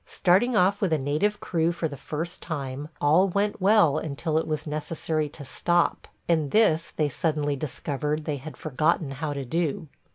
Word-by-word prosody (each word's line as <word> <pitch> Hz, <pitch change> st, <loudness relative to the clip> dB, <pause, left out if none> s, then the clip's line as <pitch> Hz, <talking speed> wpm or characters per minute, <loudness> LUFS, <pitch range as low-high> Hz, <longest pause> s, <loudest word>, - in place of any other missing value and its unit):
Starting 200 Hz, +7 st, +3 dB
off 200 Hz, 0 st, +3 dB
with 195 Hz, -4 st, +1 dB
a 160 Hz, -, +3 dB
native 150 Hz, +10 st, 0 dB
crew 165 Hz, -1 st, 0 dB
for 170 Hz, -1 st, -2 dB
the 145 Hz, -, -7 dB
first 160 Hz, +5 st, -5 dB
time, 145 Hz, -2 st, -5 dB
all 160 Hz, +7 st, +4 dB
went 200 Hz, +2 st, -1 dB
well 190 Hz, -7 st, +5 dB
until 155 Hz, +1 st, -1 dB
it -, -, -4 dB
was 155 Hz, -1 st, -2 dB
necessary 155 Hz, 0 st, -2 dB
to 145 Hz, 0 st, -10 dB
stop, 175 Hz, +5 st, 0 dB, 0.2 s
and 160 Hz, -4 st, +2 dB
this 170 Hz, -4 st, +3 dB
they 150 Hz, -, +1 dB
suddenly 145 Hz, 0 st, -1 dB
discovered 150 Hz, +1 st, -3 dB
they 150 Hz, -2 st, -2 dB
had 150 Hz, +3 st, -9 dB
forgotten 155 Hz, 0 st, 0 dB
how 145 Hz, +3 st, -3 dB
to 140 Hz, -2 st, -4 dB
do. 160 Hz, +2 st, -1 dB
155 Hz, 175 wpm, -26 LUFS, 145-175 Hz, 0.2 s, well